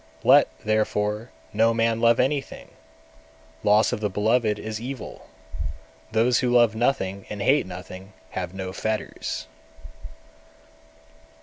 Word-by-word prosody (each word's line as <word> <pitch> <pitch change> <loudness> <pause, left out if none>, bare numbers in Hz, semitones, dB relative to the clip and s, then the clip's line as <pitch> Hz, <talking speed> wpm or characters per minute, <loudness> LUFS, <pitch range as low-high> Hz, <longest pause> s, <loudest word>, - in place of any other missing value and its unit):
211. - - -1 0.3
Let, - - -25
therefore, 110 +1 0 0.2
no 115 +2 +3
man 115 0 +1
love 115 0 +4
anything; 135 +1 -1 0.9
loss 105 +1 +4
of - - -2
the 105 -1 -1
beloved 105 +2 +1
is 110 +1 -5
evil. 130 0 -7 0.8
Those 115 +2 +3
who 125 - +1
love 120 -2 +4
nothing 100 -5 -1
and 105 - -6
hate 135 +2 +3
nothing, 95 +1 -9 0.2
have - - -4
no 95 -1 -6
fetters. 110 +1 -3
110 Hz, 120 wpm, -24 LUFS, 105-120 Hz, 0.9 s, love